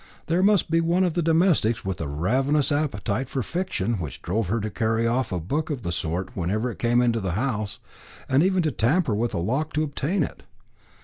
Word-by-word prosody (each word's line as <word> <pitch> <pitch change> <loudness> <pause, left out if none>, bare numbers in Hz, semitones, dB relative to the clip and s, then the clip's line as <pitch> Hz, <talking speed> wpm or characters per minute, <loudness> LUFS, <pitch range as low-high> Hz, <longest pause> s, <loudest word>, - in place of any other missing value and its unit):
There 170 +2 +1
must 200 -4 +3
be 165 0 +4
one 170 +3 +2
of 180 -3 +1
the 175 - 0
domestics 160 - +2
with 95 -3 -3
a 80 - -2
ravenous 130 - +1
appetite 135 -5 -1
for 135 -2 -2
fiction, 120 - -2
which 75 -5 -5
drove 100 +3 -1
her 115 +5 0
to 105 0 -3
carry 115 0 0
off 120 0 0
a 90 - -1
book 145 - -2
of 135 -6 -3
the 85 - -2
sort 85 +2 -3
whenever 105 +8 -1
it - - -11
came 120 +1 +3
into 115 -1 +2
the 95 -4 -2
house, 110 -1 -2 0.5
and 135 +2 +3
even 185 0 +2
to 155 - +1
tamper 125 - +1
with 115 +3 -1
a - - 0
lock 130 - -1
to 155 - +1
obtain 155 +4 -1
it. - - -6
120 Hz, 215 wpm, -25 LUFS, 105-155 Hz, 0.5 s, be